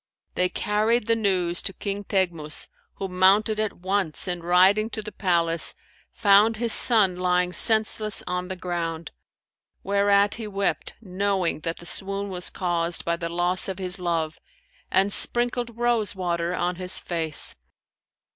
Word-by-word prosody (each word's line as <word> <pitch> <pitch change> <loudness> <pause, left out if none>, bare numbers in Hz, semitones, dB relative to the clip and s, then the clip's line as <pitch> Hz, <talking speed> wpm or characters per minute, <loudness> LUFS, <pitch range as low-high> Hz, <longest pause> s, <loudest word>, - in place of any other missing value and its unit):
They 180 0 +2
carried 215 +4 0
the 230 +1 +2
news 185 -5 0
to 195 - -3
King 200 +1 -5
Teghmus, 170 -7 -1 0.3
who 195 - -4
mounted 195 +4 +3
at 215 -1 -1
once 190 -3 -1
and 175 -2 -3
riding 190 +5 +4
to 215 - -5
the 210 - -7
palace, 170 -4 0 0.4
found 210 +2 +4
his 230 0 0
son 205 -7 +4
lying 180 0 0
senseless 215 -1 +3
on 180 0 -3
the 190 - -5
ground; 170 -2 -4 0.7
whereat 200 0 +2
he 215 - -5
wept 200 -1 -2
knowing 190 -4 -1
that 165 +1 -4
the 175 - -12
swoon 195 +2 -3
was 180 -1 -1
caused 170 -2 -2
by 170 - 0
the 170 -1 -5
loss 175 +3 0
of 190 - -4
his 185 0 -4
love, 165 -3 -2 0.5
and 195 +1 +2
sprinkled 240 -1 0
rose 235 -4 0
water 170 -2 -2
on 175 0 -2
his 185 0 -1
face. 160 -3 +1
190 Hz, 150 wpm, -24 LUFS, 175-205 Hz, 0.7 s, riding